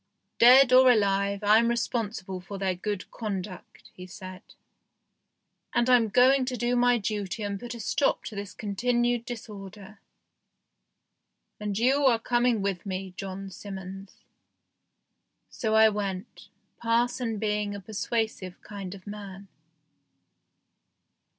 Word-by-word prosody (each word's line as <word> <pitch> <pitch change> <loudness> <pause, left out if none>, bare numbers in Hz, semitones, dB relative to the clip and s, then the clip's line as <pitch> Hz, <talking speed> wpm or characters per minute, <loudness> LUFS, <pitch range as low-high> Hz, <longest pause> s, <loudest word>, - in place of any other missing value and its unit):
"Dead 255 +2 +8
or 255 0 +8
alive, 200 -2 +2
I'm 220 +3 +5
responsible 220 -5 -2
for 195 +2 -8
their 190 -1 0
good 195 +1 -5
conduct," 195 -4 -7
he 180 0 -10
said, 185 0 -10 1.3
"and 240 +1 +3
I'm 240 -3 +5
going 255 +5 +4
to 250 -1 -3
do 240 +1 0
my 245 0 +4
duty 205 -1 -3
and 200 -1 -3
put 240 +2 -7
a - - -9
stop 280 +6 0
to 215 - -7
this 200 -1 -6
continued 240 +3 0
disorder. 210 -3 -9 1.6
And 205 -2 -3
you 265 +5 +3
are 235 -3 +4
coming 240 -2 +1
with 195 -3 -2
me, 190 -1 -5
John 195 0 -6
Simmons." 195 0 -9 1.4
So 220 -2 -1
I 220 0 +7
went, 200 -3 -5 0.3
parson 235 0 0
being 210 -1 -1
a - - -6
persuasive 215 -2 -3
kind 200 -2 -7
of 185 - -15
man. 200 -2 -9
210 Hz, 125 wpm, -27 LUFS, 195-235 Hz, 1.6 s, Dead